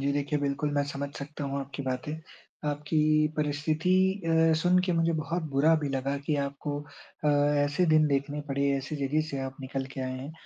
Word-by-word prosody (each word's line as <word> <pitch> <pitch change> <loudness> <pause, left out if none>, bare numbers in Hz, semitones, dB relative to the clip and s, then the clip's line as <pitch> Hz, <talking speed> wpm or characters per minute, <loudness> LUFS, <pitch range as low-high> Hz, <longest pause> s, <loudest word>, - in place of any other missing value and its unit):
जी 140 +1 +1
देखिए 145 +1 0
बिल्कुल 145 +1 -1
मैं 145 - +3
समझ 140 0 -4
सकता 145 +1 -6
हूँ 140 0 -2
आपकी 140 +1 -6
बातें। 130 +3 -3 0.6
आपकी 155 +1 +2
परिस्थिति 150 +3 0 0.4
अ, 165 0 +4
सुन 180 +3 +3
के 180 - +1
मुझे 165 0 +2
बहुत 165 +2 -2
बुरा 150 +4 +5
भी 150 -2 -2
लगा 135 +1 -1
कि 150 - +1
आपको 140 +1 -3 0.5
अ, - - +4 0.4
ऐसे 145 +5 +1
दिन 155 -1 +5
देखने 140 +1 -1
पड़े 140 +1 +1
ऐसी 145 +3 -4
जगह 140 +2 +1
से 140 - -3
आप 130 0 -6
निकल 135 0 -3
के 135 - -4
आए 130 0 -3
हैं। 140 +4 -7
145 Hz, 195 wpm, -28 LUFS, 140-155 Hz, 0.6 s, बुरा